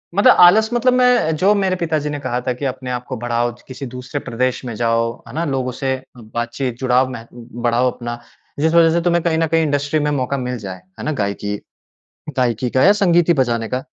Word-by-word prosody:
मतलब 200 Hz, -, +6 dB
आलस 215 Hz, +5 st, +7 dB
मतलब 250 Hz, +1 st, +3 dB
मैं 250 Hz, -10 st, +3 dB
जो 190 Hz, +6 st, +3 dB
मेरे 190 Hz, -2 st, +1 dB
पिताजी 160 Hz, -4 st, -1 dB
ने 145 Hz, -1 st, -4 dB
कहा 125 Hz, -2 st, -2 dB
था 125 Hz, -, +1 dB
कि 125 Hz, +3 st, -6 dB
अपने 130 Hz, -1 st, -4 dB
आपको 125 Hz, +1 st, -4 dB
बढ़ाओ, 120 Hz, 0 st, -1 dB
च 120 Hz, -, -17 dB
किसी 130 Hz, +1 st, -7 dB
दूसरे 125 Hz, +3 st, -5 dB
प्रदेश 125 Hz, +1 st, -2 dB
में 120 Hz, -, -4 dB
जाओ, 115 Hz, +1 st, 0 dB
है -, -, -11 dB
ना? 165 Hz, +2 st, -1 dB
लोगों 130 Hz, -3 st, -1 dB
से 130 Hz, +1 st, -2 dB, 0.2 s
बातचीत 120 Hz, +2 st, -4 dB
जुड़ाव 130 Hz, 0 st, +2 dB
मेह 115 Hz, -3 st, -8 dB
बढ़ाओ 120 Hz, +1 st, -1 dB
अपना। 120 Hz, -1 st, -6 dB, 0.4 s
जिस 160 Hz, +2 st, +2 dB
वज़ह 165 Hz, -1 st, +6 dB
से -, -, +1 dB
तुम्हें 170 Hz, -1 st, +2 dB
कहीं 165 Hz, -2 st, +1 dB
न 165 Hz, 0 st, +1 dB
कहीं 165 Hz, +1 st, +2 dB
इंडस्ट्री 145 Hz, 0 st, 0 dB
में 150 Hz, 0 st, 0 dB
मौक़ा 140 Hz, 0 st, -1 dB
मिल 125 Hz, -1 st, -3 dB
जाए, 95 Hz, -4 st, -8 dB, 0.2 s
है -, -, -5 dB
ना? 155 Hz, -, 0 dB
गायिकी 105 Hz, -4 st, -2 dB, 0.8 s
गायिकी 125 Hz, -1 st, 0 dB
का 130 Hz, -, +2 dB
या 200 Hz, -, +7 dB
संगीत 175 Hz, -2 st, +4 dB
ही 170 Hz, -, +5 dB
बजाने 120 Hz, -4 st, 0 dB
का। 130 Hz, +1 st, -3 dB
130 Hz, 220 wpm, -19 LUFS, 120-160 Hz, 0.8 s, आलस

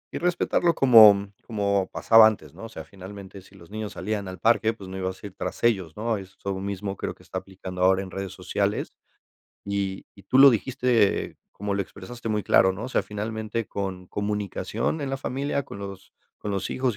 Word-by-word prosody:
Y -, -, -2 dB
respetarlo 175 Hz, -1 st, +1 dB
como 105 Hz, -7 st, +7 dB
como 100 Hz, -4 st, 0 dB
pasaba 115 Hz, -1 st, +7 dB
antes, 80 Hz, -10 st, -3 dB
¿no?, -, -, -9 dB
o -, -, -8 dB
sea, 80 Hz, -, -8 dB
finalmente, 95 Hz, +2 st, -10 dB
si 95 Hz, +1 st, -19 dB
los 85 Hz, 0 st, -16 dB
niños 110 Hz, -1 st, -5 dB
salían 105 Hz, 0 st, -3 dB
al 95 Hz, 0 st, -7 dB
parque, 110 Hz, +2 st, +3 dB
pues 100 Hz, -4 st, -11 dB
no 95 Hz, -, -7 dB
ibas 95 Hz, 0 st, -4 dB
a -, -, -7 dB
ir 100 Hz, -, -8 dB
tras 90 Hz, +5 st, -5 dB
ellos, 95 Hz, -8 st, +1 dB
¿no? 110 Hz, 0 st, 0 dB
Eso 100 Hz, 0 st, -6 dB
mismo 100 Hz, 0 st, -4 dB
creo -, -, -4 dB
que -, -, -20 dB
está -, -, -4 dB
aplicando 95 Hz, -1 st, -8 dB
ahora 95 Hz, +1 st, +4 dB
en 95 Hz, -, -9 dB
redes 95 Hz, -1 st, -5 dB
sociales. -, -, -2 dB, 0.7 s
Y 100 Hz, -1 st, -3 dB
y 100 Hz, -, -16 dB
tú 130 Hz, -, +1 dB
lo 140 Hz, 0 st, +11 dB
dijiste, 120 Hz, -2 st, +1 dB, 0.2 s
como 100 Hz, 0 st, -3 dB
lo 100 Hz, -, +1 dB
expresaste 115 Hz, +5 st, -8 dB
muy 105 Hz, -2 st, 0 dB
claro, 95 Hz, 0 st, +4 dB
¿no?, 100 Hz, -, -7 dB
o 125 Hz, -, -5 dB
sea, -, -, +1 dB
finalmente 110 Hz, +1 st, -4 dB
con 95 Hz, -2 st, -4 dB
comunicación 105 Hz, -, -2 dB
en 140 Hz, -, -3 dB
la 135 Hz, -, -1 dB
familia, 140 Hz, +1 st, -2 dB
con 100 Hz, -, -10 dB
los 100 Hz, -1 st, -9 dB, 0.3 s
con 105 Hz, -, -4 dB
los 100 Hz, -2 st, -2 dB
hijos 130 Hz, -4 st, 0 dB
100 Hz, 205 wpm, -25 LUFS, 95-115 Hz, 0.7 s, lo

